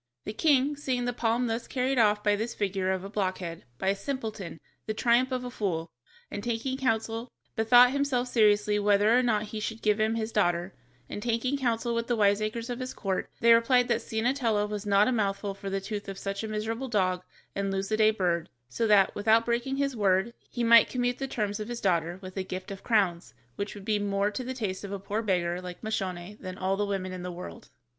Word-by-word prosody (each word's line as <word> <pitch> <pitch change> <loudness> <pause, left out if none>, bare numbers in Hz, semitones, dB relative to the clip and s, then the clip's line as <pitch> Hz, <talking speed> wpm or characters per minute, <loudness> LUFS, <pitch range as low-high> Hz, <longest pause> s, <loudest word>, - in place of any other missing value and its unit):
The 210 - -4
king, 285 +2 +3
seeing 260 -4 -2
the 245 - -1
palm 235 +1 +1
thus 230 0 -2
carried 260 0 0
off 210 -2 +3
by 205 -1 +3
this 225 +3 -3
figure 195 -2 -1
of 190 -1 -1
a - - -5
blockhead, 185 -5 -3
by 190 - 0
a 195 - +2
simpleton, 215 - -5 0.3
the 215 - -2
triumph 240 +3 +3
of 255 -1 -2
a 250 - -5
fool, 170 -8 -2 0.4
bethought 235 0 +2
himself 275 -3 0
seriously 210 -3 +3
whether 205 +2 +4
or 250 - +5
not 220 -4 +1
he 215 - -2
should 220 +1 -5
give 210 0 +2
him 220 +1 +2
his 225 0 -2
daughter, 175 -3 +1 0.3
and 205 - -6
taking 235 +4 0
counsel 235 -3 0
with 230 0 -1
the 240 - +1
wiseacres 215 +2 +1
of 245 - -4
his 255 0 -5
court, 190 -2 -2
they 235 0 +7
replied 245 +1 +4
that 235 -1 +1
Ciennetella 225 -2 0
was 210 0 -5
not 200 +1 +4
a - - +2
mouthful 200 -3 -1
for 195 0 -7
the 195 0 -1
tooth 205 +1 -5
of 195 - -6
such 195 +1 -4
a - - -3
miserable 220 +4 -3
dog 185 -4 +1 0.3
and 200 0 -2
lose 195 0 -2
the 215 - +1
day 215 0 +5
bird, 175 -6 0 0.2
so 225 - -1
that, 200 -2 +5
without 220 +2 +3
breaking 240 +3 -1
his 275 -2 0
word, 200 +1 +2 0.2
he 240 - -3
might 230 0 +7
commute 245 -1 -1
the 270 - -2
terms 210 -5 -2
of 215 - -4
his 240 0 -4
daughter 175 -3 0
with 185 0 -8
a 190 - 0
gift 185 +1 -6
of 195 - -7
crowns, 190 -7 +1 0.2
which 200 +1 -4
would 200 -1 -10
be 210 -1 +1
more 200 0 0
to 230 +5 -4
the 260 +1 -5
taste 205 -6 -3
of 200 - -6
a 200 - -2
poor 200 +3 -3
beggar 180 -4 0
like 180 +2 -9
Moscione 190 -2 -4
than 185 0 -6
all 190 +1 0
the 205 +1 -1
women 190 -2 -2
in 185 -1 -6
the 180 0 -5
world. 175 +1 -9
215 Hz, 220 wpm, -28 LUFS, 195-235 Hz, 0.4 s, they